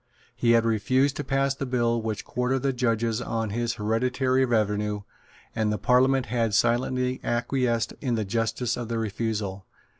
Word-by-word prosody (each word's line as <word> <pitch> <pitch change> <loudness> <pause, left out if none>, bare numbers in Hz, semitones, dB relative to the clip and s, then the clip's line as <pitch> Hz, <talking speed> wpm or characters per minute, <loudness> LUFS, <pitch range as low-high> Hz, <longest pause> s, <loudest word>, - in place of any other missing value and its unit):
He 115 -1 +3
had 115 -1 +4
refused 130 +5 +2
to 145 - -2
pass 135 0 +1
the 135 0 -5
bill 120 -2 +1
which 110 -2 -4
quartered 125 +1 -1
the 135 -1 +1
judges 115 -2 0
on 115 -3 -2
his 120 +1 -1
hereditary 125 +4 +1
revenue; 105 -3 0 0.5
and 110 -2 +1
the 105 - -1
Parliament 130 +4 +3
had 115 -2 0
silently 125 +3 +1
acquiesced 120 -1 0
in 125 -4 0
the 110 -2 -1
justice 115 +3 -1
of 120 -2 -4
the 115 0 -2
refusal. 105 -3 -3
115 Hz, 160 wpm, -26 LUFS, 110-125 Hz, 0.5 s, had